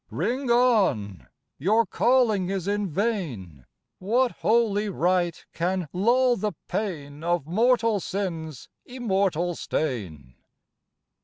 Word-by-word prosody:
Ring 240 - -2
on! 190 - +2 0.3
Your 215 +9 +3
calling 220 -4 +2
is 195 -2 -3
in 205 -1 -1
vain, 145 - -3 0.3
What 235 +6 +1
holy 215 -2 +1
rite 175 -2 0
can 175 -1 -2
lull 245 +6 +3
the 210 -1 -2
pain 150 -8 -4
Of 175 -3 0
mortal 225 +4 +2
Sin's 165 -8 -4 0.2
Immortal 195 -8 -1
stain. 95 - -4
190 Hz, 100 wpm, -25 LUFS, 160-225 Hz, 0.3 s, Your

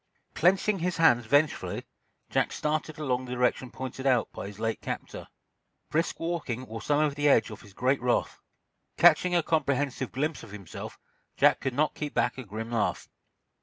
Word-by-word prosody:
Clenching 195 +3 +2
his 175 0 -1
hands 120 -9 +4
vengefully, 145 +4 +1 0.5
Jack - - +1
started 155 0 -2
along 130 -5 0
in 130 - -8
the - - -7
direction 125 +1 0
pointed 130 +2 -5
out 125 -4 +2
by - - -6
his 100 0 -10
late 115 0 -2
captor. - - -6 0.6
Brisk 165 +3 0
walking 155 -8 -3
wore 115 -1 -7
some 145 0 +2
of 150 -2 +2
the 145 +1 +2
edge 110 -4 +4
off 110 - -9
his 100 -2 -16
great 130 +1 +1
wrath. 125 -1 0 0.6
Catching 175 +2 +5
a 170 - +3
comprehensive 140 -4 0
glimpse 150 +3 -2
of - - -11
himself, 100 -3 -8 0.4
Jack - - +5
could 130 -2 -3
not 155 +2 +2
keep 150 -1 -5
back 120 +2 +1
a - - -5
grim 110 +2 -6
laugh. 115 -3 -1
135 Hz, 180 wpm, -28 LUFS, 120-155 Hz, 0.6 s, Catching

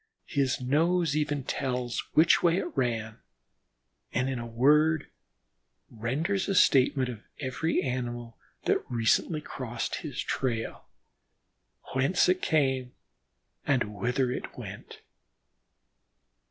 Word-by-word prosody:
His 140 -3 0
nose 160 +5 +2
even 145 -2 0
tells 125 -2 -2 0.2
which 160 +2 +6
way 170 0 +3
it 180 - -3
ran, 115 -4 -1 0.9
and 130 +3 0
in 130 - -3
a 120 - -5
word 150 +6 +3 0.9
renders 155 - -1
a 195 - +1
statement 135 -5 +4
of 115 -4 -6 0.2
every 145 +4 -1
animal 120 -2 -3 0.3
that - - +2
recently 120 +7 +1
crossed 120 -5 -4
his 145 -5 -6
trail, 115 -4 -2 1.1
whence 135 +8 +3
it 185 +1 +2
came, 130 -5 +1 0.7
and 120 -7 +1
whither 125 +4 0
it - - -6
went. - - -9
130 Hz, 110 wpm, -28 LUFS, 120-155 Hz, 1.1 s, which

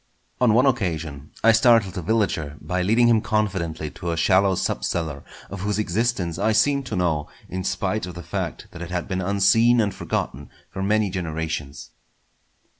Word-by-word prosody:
On 120 -4 +4
one 125 - +5
occasion 80 - -1
I 115 - +7
startled 115 -4 +4
a 90 - -3
villager 80 -7 -1
by 90 +5 -2
leading 115 +6 +3
him 115 -2 +4
confidently 85 -9 -1
to 85 +5 -6
a 85 - -1
shallow 95 +3 +3
sub - - -2
cellar, 80 -5 -2 0.3
of 100 - -6
whose 105 +1 -1
existence 105 -4 -1
I 110 - +2
seemed 140 +4 +2
to 110 - -3
know 80 -5 0 0.2
in 95 0 -4
spite 100 +1 -1
of 90 - -8
the 90 - -7
fact - - -5
that 85 - -10
it 85 - -6
had 90 -1 -3
been 95 -1 -2
unseen 100 +5 +4
and 105 -4 +1
forgotten 70 +3 -4 0.2
for 95 - -5
many 105 0 +1
generations. 80 -5 -4
95 Hz, 180 wpm, -23 LUFS, 85-110 Hz, 0.3 s, I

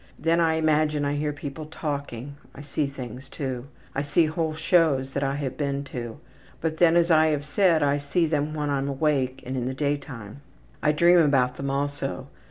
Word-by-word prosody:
Then 165 +3 +2
I 165 -1 +3
imagine 155 -2 +2
I 140 - 0
hear 150 +1 -1
people 145 +1 -7
talking. 145 -4 -5 0.2
I 140 - -9
see 145 0 -1
things 130 -1 -8
too. 130 -3 -4 0.3
I 140 - -1
see 145 +3 +3
whole 160 0 -1
shows 155 -5 +2
that 140 - -1
I 135 0 0
have 140 -3 -4
been 140 -1 -1
to. 120 0 -5 0.4
But 160 -1 -2
then, 170 -1 +5
as 170 0 +3
I 160 0 +6
have 150 -2 0
said, 165 -1 +3
I 145 0 +2
see 155 +5 +1
them 155 -1 -1
when 150 -1 -1
I'm 140 0 0
awake 135 -2 0
and 130 +2 -4
in 125 -2 -2
the 130 - -3
daytime. 140 -5 -4 0.4
I 150 - +3
dream 170 +3 +5
about 135 -5 +3
them 140 0 -3
also. 140 -1 -3
145 Hz, 195 wpm, -25 LUFS, 135-155 Hz, 0.4 s, I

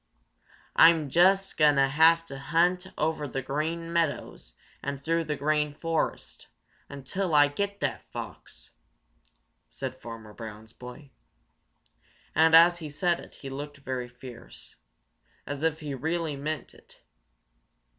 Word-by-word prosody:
"I'm 160 -3 +6
just 195 +4 +3
going 150 -2 +5
to 135 0 +4
hunt 165 +3 +2
over 155 -1 -1
the 135 0 -4
Green 165 +5 -3
Meadows 145 - -2 0.3
and 140 -1 -4
through 165 +1 0
the 150 -1 -2
Green 150 0 0
Forest 165 0 -3 0.4
until 155 +6 -3
I 145 0 +7
get 200 +7 -3
that - - -3
fox!" - - -9 1.0
said - - -6
Farmer 115 -2 -9
Brown's 110 0 -10
boy, 125 +3 -11 1.2
and 160 0 +5
as 170 +1 +7
he 155 -3 -6
said 170 +4 0
it - - -13
he 135 - -9
looked 145 +1 -7
very 130 -3 -5
fierce, 120 - -12 0.7
as 145 +1 -5
if 160 0 0
he 145 -2 -4
really 160 +3 -2
meant 150 +3 -5
it. - - -18
150 Hz, 125 wpm, -27 LUFS, 135-165 Hz, 1.2 s, I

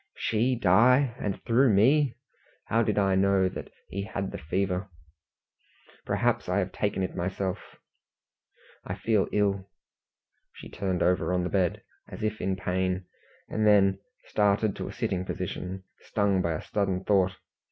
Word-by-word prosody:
"She 120 +4 +1
die! 120 +6 +4
and 100 -2 -3
through 120 +2 +4
me? 130 +7 +4 0.5
How 115 - +2
did 105 -2 0
I 95 -2 +3
know 95 0 +3
that 95 - -7 0.2
he 100 - -4
had 100 -1 -4
the - - -6
fever? 95 +4 -2 1.2
Perhaps - - 0
I - - +1
have - - 0
taken 95 - -1
it 95 - -4
myself 95 +1 -3 1.1
I - - -4
feel 110 -4 +1
ill." 100 -2 0 0.8
She - - -11
turned 95 -2 -1
over 90 0 +2
on 90 -1 +1
the 90 - -2
bed, 95 -4 0 0.3
as - - -8
if 110 0 -2
in 95 0 0
pain, 95 0 -1 0.4
and 110 0 0
then 100 -2 +5 0.3
started 105 0 +1
to - - -4
a - - -6
sitting 90 -1 -2
position, 95 0 -5 0.2
stung 100 -3 +1
by 85 -2 0
a 80 - -5
sudden 95 -3 -1
thought. 95 -2 +2
100 Hz, 150 wpm, -27 LUFS, 95-105 Hz, 1.2 s, then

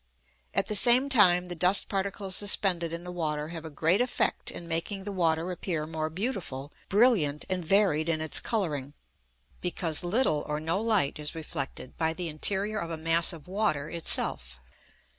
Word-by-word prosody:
At - - +2
the - - -4
same 245 +6 +6
time, 180 -8 +4
the 180 - -6
dust 180 +3 +3
particles 195 -1 -3
suspended 185 -5 +3
in 170 +1 -6
the 180 - -8
water 155 -3 -3
have 165 -1 -8
a - - -6
great 165 +7 +1
effect 250 - -1
in 170 - -7
making 170 +4 -2
the 205 - -5
water 170 -2 0
appear 170 -3 -3
more 155 0 -4
beautiful, 160 - -5 0.2
brilliant, 195 - +2
and 185 -1 -1
varied 170 -3 +2
in 160 -1 0
its 155 -1 -1
colouring; 150 - -3 0.7
because 170 -3 +1
little 175 - +1
or 150 0 -2
no 165 +6 -1
light 215 -11 +1
is 150 +2 -2
reflected 140 -5 -6
by 160 -1 0
the 170 0 -5
interior 200 +7 0
of 170 - -5
a 165 - -4
mass 165 +2 +2
of 165 -3 -11
water 180 -7 -1
itself. 65 - +1
170 Hz, 175 wpm, -27 LUFS, 155-195 Hz, 0.7 s, same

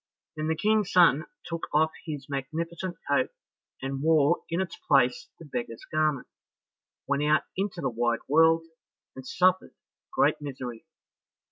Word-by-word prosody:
Then 155 0 -3
the 160 - +1
King's 215 +2 +1
son 170 -4 +5 0.2
took 165 -1 -4
off 155 +1 +3 0.2
his 145 -3 -5
magnificent 165 +6 -4
coat, 145 - +2 0.5
and 135 0 -3
wore 160 +1 +4
in 170 - -1
its 190 -3 -3
place 130 -3 +2
the 165 - -12
beggar's 120 -5 -5
garment, 155 -4 +1 0.8
went 140 0 0
out 150 +1 +3
into 195 -2 -2
the - - 0
wide 120 0 0
world, 165 +2 +4 0.5
and 130 0 -9
suffered 185 +1 +2 0.4
great - - +2
misery. 130 -2 -7
155 Hz, 140 wpm, -27 LUFS, 135-165 Hz, 0.8 s, son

